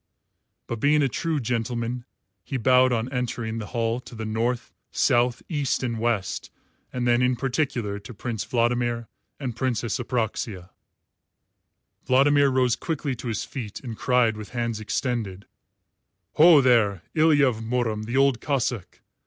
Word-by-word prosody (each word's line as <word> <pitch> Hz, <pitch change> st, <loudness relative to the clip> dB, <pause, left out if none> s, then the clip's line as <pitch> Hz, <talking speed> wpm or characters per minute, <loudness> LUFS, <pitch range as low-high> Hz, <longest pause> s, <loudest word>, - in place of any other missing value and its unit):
But 115 Hz, -, -5 dB
being 150 Hz, +4 st, +3 dB
a -, -, +3 dB
true 160 Hz, +4 st, -1 dB
gentleman, 120 Hz, 0 st, -2 dB, 0.4 s
he 135 Hz, -, -3 dB
bowed 130 Hz, +1 st, +4 dB
on 115 Hz, -1 st, 0 dB
entering 120 Hz, -2 st, -2 dB
the 105 Hz, -, -6 dB
hall 115 Hz, 0 st, -1 dB
to 125 Hz, -, -12 dB
the 110 Hz, 0 st, -5 dB
North, 115 Hz, +3 st, -2 dB, 0.2 s
South, 120 Hz, 0 st, +2 dB
East, 145 Hz, -5 st, -1 dB
and 115 Hz, -3 st, -2 dB
West, 110 Hz, -5 st, -1 dB, 0.4 s
and 125 Hz, -1 st, -2 dB
then 120 Hz, 0 st, +4 dB
in 125 Hz, 0 st, +2 dB
particular 125 Hz, -6 st, -1 dB
to 105 Hz, +5 st, -11 dB
Prince 115 Hz, 0 st, -4 dB
Vladimir 120 Hz, -1 st, 0 dB, 0.3 s
and 130 Hz, -5 st, -4 dB
Princess 120 Hz, -2 st, -1 dB
Apraxia. 110 Hz, -6 st, -3 dB, 1.3 s
Vladimir 140 Hz, +2 st, +4 dB
rose 130 Hz, -2 st, +2 dB
quickly 150 Hz, -4 st, -3 dB
to 120 Hz, -, -7 dB
his 110 Hz, -3 st, -2 dB
feet 115 Hz, -7 st, -6 dB
and 120 Hz, -4 st, -6 dB
cried 120 Hz, -2 st, +2 dB
with 105 Hz, -2 st, -8 dB
hands 115 Hz, -2 st, -1 dB
extended, 110 Hz, -4 st, -3 dB, 0.9 s
"Ho, 160 Hz, -2 st, +7 dB
there, 110 Hz, -8 st, +3 dB
Ilya 155 Hz, -3 st, +5 dB
of 120 Hz, -4 st, 0 dB
Murom 115 Hz, -2 st, -1 dB
the 120 Hz, +4 st, -2 dB
Old 135 Hz, -3 st, +4 dB
Cossáck. 125 Hz, -8 st, -2 dB
120 Hz, 145 wpm, -25 LUFS, 115-130 Hz, 1.3 s, Ho